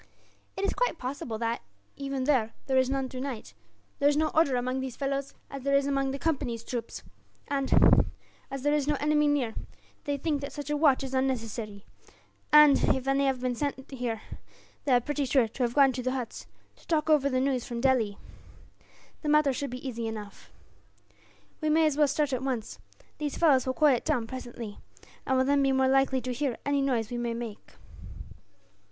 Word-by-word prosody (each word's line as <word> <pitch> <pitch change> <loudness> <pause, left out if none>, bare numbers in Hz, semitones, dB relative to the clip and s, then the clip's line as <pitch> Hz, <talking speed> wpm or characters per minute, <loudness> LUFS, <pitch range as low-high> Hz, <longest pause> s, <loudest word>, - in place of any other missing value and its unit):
"It 390 - 0
is - - 0
quite - - 0
possible 250 -4 -4
that, 230 +1 -2 0.3
even 275 -1 -3
there, 255 -6 +1
there 265 -1 +3
is 260 0 +2
none 270 -1 -1
tonight. 255 -2 -6 0.5
There 285 0 +5
is 290 - +1
no 310 0 +2
order 305 -5 +3
among 255 +1 -1
these 260 -2 -5
fellows, 275 0 -3 0.2
as 275 - -6
there 275 +1 +1
is 280 0 +3
among 275 -1 0
the 270 - -3
Company's 270 -7 -2
troops 235 -1 -5 0.5
and, 275 -1 +4 0.4
as 275 -1 -6
there 290 0 +2
is 295 -2 +1
no 295 - +2
enemy 300 +1 +2
near, 275 -6 +1 0.5
they 285 -1 -1
think 290 0 -1
that 280 - -6
such 290 0 -5
a - - +1
watch 290 -3 +3
is 265 -1 -5
unnecessary; 225 -6 -2 0.7
and 300 -2 +7
if 265 0 -5
any 275 0 +2
have 260 -2 0
been 250 -1 0
sent 270 +1 -4
there, 240 -5 -4 0.6
they 280 - +1
are 245 - +6
pretty 295 +3 -2
sure 260 -2 +3
to 225 - -8
have 240 -1 0
gone 275 -2 +6
to 250 0 -4
the 255 +1 -1
huts, 250 -4 -5 0.3
to - - -22
talk 315 -2 +1
over 295 -3 +4
the 255 -1 +1
news 260 -2 0
from 235 -1 -5
Delhi. 235 -6 +2 1.0
The 300 - -2
matter 300 -2 +4
should 280 +2 -3
be 250 +2 -6
easy 230 -2 -3
enough. 210 -2 -8 1.1
"We 310 - 0
may 315 +1 +4
as 305 -2 +2
well 295 0 +4
start 285 0 0
at 255 - -1
once. 255 -5 -3 0.4
These 295 -2 -3
fellows 275 -6 +4
will 260 - -1
quieten 285 -6 +4
down 235 - 0
presently, 235 -3 -7 0.5
and 260 - +2
will 260 - +3
then 280 +1 +3
be 270 -1 +3
more 265 0 +3
likely 270 0 +3
to 250 +1 -3
hear 265 -1 -2
any 285 0 +1
noise 245 -5 0
we 245 - -3
may 235 -1 -2
make." 230 -3 -7
270 Hz, 200 wpm, -28 LUFS, 245-285 Hz, 1.1 s, and